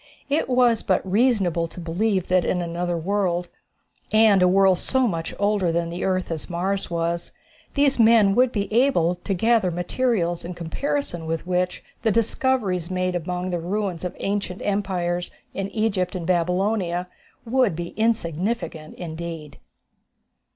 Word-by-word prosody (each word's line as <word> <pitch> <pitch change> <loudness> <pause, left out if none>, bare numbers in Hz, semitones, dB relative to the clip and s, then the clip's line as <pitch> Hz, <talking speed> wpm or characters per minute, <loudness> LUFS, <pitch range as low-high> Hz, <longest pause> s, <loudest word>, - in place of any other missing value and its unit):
It 285 -1 +1
was 245 -3 +3
but 185 - +1
reasonable 195 -6 +2
to 170 - -11
believe 185 +3 0
that 180 -1 +3
in 180 - 0
another 175 0 -2
world, 180 0 -1 0.6
and 215 -3 +5
a 180 - +6
world 190 0 +4
so 260 -1 +1
much 165 -5 -3
older 200 -4 +1
than 170 0 -1
the 175 - -4
earth 185 -2 0
as 160 +1 -5
Mars 190 +3 -1
was, 170 0 -2 0.4
these 280 -3 +3
men 220 -3 +6
would 250 +3 +4
be 205 -3 -1
able 230 -9 +3
to 185 +3 -3
gather 225 0 +3
materials 175 0 -1
in 175 +1 -6
comparison 175 - -3
with 165 +1 -2
which 180 0 -1 0.2
the 225 - +2
discoveries 215 -5 0
made 185 0 -1
among 180 +1 -3
the 175 - -1
ruins 185 0 -2
of 180 - -4
ancient 195 -2 -2
empires 180 -4 -1 0.2
in 195 0 -3
Egypt 200 -4 -1
and 175 -2 -4
Babylonia 180 +1 0 0.4
would 240 -6 +2
be 170 +1 -4
insignificant 195 -5 -2
indeed. 160 -3 -7
185 Hz, 150 wpm, -23 LUFS, 175-215 Hz, 0.6 s, a